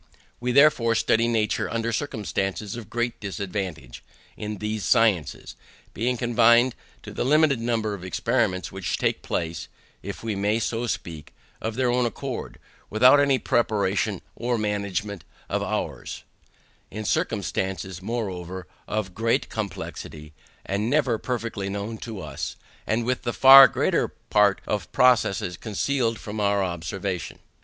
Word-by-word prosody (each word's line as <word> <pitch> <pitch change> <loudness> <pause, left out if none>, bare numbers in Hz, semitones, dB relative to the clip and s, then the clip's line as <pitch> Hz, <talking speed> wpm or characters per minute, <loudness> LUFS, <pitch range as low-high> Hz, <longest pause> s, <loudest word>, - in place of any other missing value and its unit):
We 125 +1 -1
therefore 125 -4 +5
study 115 +1 +2
nature 110 -2 0
under 115 0 -2
circumstances 105 -5 -2
of 115 -5 -8
great 120 0 -2
disadvantage 95 - -5 0.3
in 105 0 -5
these 105 0 -3
sciences; 100 -10 +1 0.4
being 125 +4 -1
confined 120 +1 +4 0.3
to - - -9
the - - -1
limited 150 -1 +4
number 115 -2 -1
of 95 -3 -7
experiments 95 0 0
which 95 -1 -3
take - - 0
place 80 -1 -3 0.3
(if - - -7
we 110 -2 -2
may 105 +3 +1
so 115 +1 -2
speak) 80 -8 -5 0.3
of 110 0 -3
their 125 -1 +1
own 125 0 +2
accord, 130 +1 -6 0.3
without 125 +6 +6
any 140 -2 +4
preparation 105 -5 0
or 120 0 -1
management 100 -3 -2 0.3
of - - 0
ours; - - -4 0.7
in 110 0 -6
circumstances, 95 -3 -2
moreover, 95 -5 -4 0.2
of 105 -4 -3
great 115 +3 0
complexity, 80 -7 -6 0.3
and 100 +4 -1
never 130 -5 +2
perfectly 115 -5 -3
known 100 +3 -4
to 110 -5 -7
us; - - -5 0.3
and 115 +2 0
with 125 +1 0
the 120 - -2
far 135 0 +10
greater - - +1
part 105 -2 +1
of 105 - -1
the - - -32
processes 105 -7 +2
concealed 115 +1 -1
from 105 +1 -6
our 100 -1 +2
observation. 90 +1 -4
110 Hz, 140 wpm, -25 LUFS, 100-120 Hz, 0.7 s, far